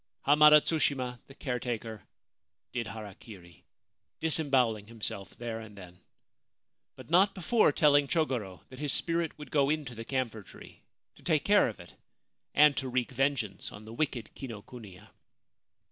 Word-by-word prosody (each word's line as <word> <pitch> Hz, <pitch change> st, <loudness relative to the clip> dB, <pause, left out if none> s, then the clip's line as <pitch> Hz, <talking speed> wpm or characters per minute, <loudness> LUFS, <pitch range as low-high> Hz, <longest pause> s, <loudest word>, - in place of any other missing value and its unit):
Hamada 150 Hz, +1 st, +8 dB
Tsushima, 130 Hz, -6 st, -1 dB
the 135 Hz, -, -14 dB
caretaker, 120 Hz, -6 st, -4 dB, 0.7 s
did 120 Hz, -2 st, -2 dB
harakiri, 100 Hz, -4 st, -11 dB, 0.6 s
dis 160 Hz, 0 st, +2 dB
embowelling 125 Hz, -8 st, +1 dB
himself 110 Hz, -4 st, -6 dB
there 115 Hz, -1 st, -5 dB
and 110 Hz, -2 st, -11 dB
then; 90 Hz, -2 st, -12 dB, 1.0 s
but -, -, -13 dB
not 195 Hz, +3 st, +4 dB
before 195 Hz, +1 st, +3 dB
telling 145 Hz, -1 st, +4 dB
Chogoro 125 Hz, -, -1 dB
that 130 Hz, -, -12 dB
his 145 Hz, -2 st, -1 dB
spirit 165 Hz, 0 st, 0 dB
would 150 Hz, -, -10 dB
go 140 Hz, -2 st, +3 dB
into 150 Hz, -5 st, -2 dB
the 115 Hz, 0 st, -7 dB
camphor 120 Hz, -3 st, -2 dB
tree, 95 Hz, -, -14 dB, 0.4 s
to -, -, -18 dB
take -, -, +1 dB
care -, -, +5 dB
of -, -, -9 dB
it, -, -, -13 dB, 0.6 s
and 150 Hz, -1 st, +6 dB
to 130 Hz, -, -2 dB
wreak 125 Hz, -1 st, -1 dB
vengeance 135 Hz, -7 st, -1 dB
on 105 Hz, +1 st, -11 dB
the 110 Hz, -, -10 dB
wicked 125 Hz, -4 st, -2 dB
Kinokuniya. 110 Hz, -4 st, -10 dB
125 Hz, 145 wpm, -30 LUFS, 110-145 Hz, 1.0 s, Hamada